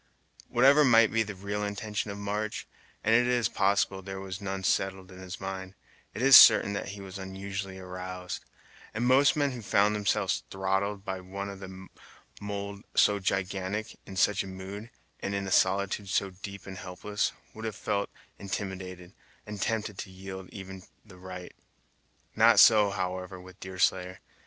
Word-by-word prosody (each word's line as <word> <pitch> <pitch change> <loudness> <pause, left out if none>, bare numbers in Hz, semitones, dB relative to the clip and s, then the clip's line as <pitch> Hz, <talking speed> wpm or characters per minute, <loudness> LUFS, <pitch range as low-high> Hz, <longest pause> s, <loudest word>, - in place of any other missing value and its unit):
Whatever 135 +5 +6
might 115 -5 +6
be 115 - +2
the 105 -2 -3
real 100 +2 -3
intention 105 +1 -3
of 100 - -5
March, 105 +1 -3 0.4
and 110 - +3
it 120 +1 +5
is 125 -2 +2
probable 100 -1 +1
there 95 0 -6
was 95 +1 -6
none 95 -1 -4
settled 95 0 0
in 95 - -12
his 95 0 -8
mind, 95 0 -6 0.4
it 115 - -3
is 135 -1 +9
certain 105 -4 +9
that 100 - -3
he 100 +1 -7
was 95 0 -8
unusually 95 0 -5
aroused; 90 0 -6 0.5
and 115 +2 0
most 135 +3 +5
men 145 -2 +1
who 125 -2 -7
found 100 +1 +3
themselves 100 -6 0
throttled 95 +1 -1
by 95 -1 -4
one 100 +2 -6
of 100 0 -9
a 95 0 -9 0.6
mould 100 0 -5
so 105 -1 +4
gigantic, 95 +2 -2
in 95 - -8
such 100 +2 +3
a - - -9
mood, 95 +4 -8 0.3
and 100 - -3
in 100 0 -2
a 95 - -5
solitude 100 +1 +2
so 95 +1 0
deep 100 +1 -9
and 95 -1 -8
helpless, 105 +5 -2 0.2
would 110 +1 -8
have 110 -3 -3
felt 100 -1 -2 0.3
intimidated, 95 -2 -6 0.3
and 105 -2 -7
tempted 105 -3 -2
to 95 - -5
yield 95 0 -9
even 95 -1 -9 0.2
the 95 -4 -15
right. 90 -1 -8 0.8
Not - - +6
so, 105 -2 +7
however, 95 -1 -4
with 90 0 -14
Deerslayer. 95 0 -1
100 Hz, 170 wpm, -29 LUFS, 95-105 Hz, 0.8 s, is